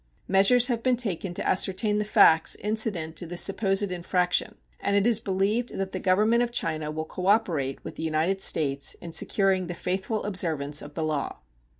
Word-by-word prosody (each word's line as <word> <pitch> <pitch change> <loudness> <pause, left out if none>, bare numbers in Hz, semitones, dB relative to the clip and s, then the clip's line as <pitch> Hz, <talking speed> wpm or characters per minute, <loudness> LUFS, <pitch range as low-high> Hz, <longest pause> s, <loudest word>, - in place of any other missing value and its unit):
Measures 200 +6 +4
have 240 -3 -1
been 255 0 +1
taken 195 -6 -3
to 175 - -4
ascertain 195 +3 +1
the - - 0
facts 160 -5 +4
incident 205 -7 -1
to 175 - -4
this 175 +1 +1
supposed 195 -1 0
infraction, 180 0 0 0.2
and 200 - -1
it 200 0 +2
is 235 -2 +2
believed 205 +4 -1
that 195 0 -3
the 185 - -4
Government 215 +6 +2
of 240 - 0
China 155 -9 -2
will 155 +1 -4
cooperate 180 -8 0
with - - -9
the - - -6
United 160 +5 0
States 140 -6 +1
in 170 - -10
securing 190 +1 +1
the 175 - -5
faithful 190 +5 -3
observance 155 -7 -1
of 145 0 -11
the 160 - -2
law. 155 -3 -2
190 Hz, 185 wpm, -26 LUFS, 160-210 Hz, 0.2 s, Measures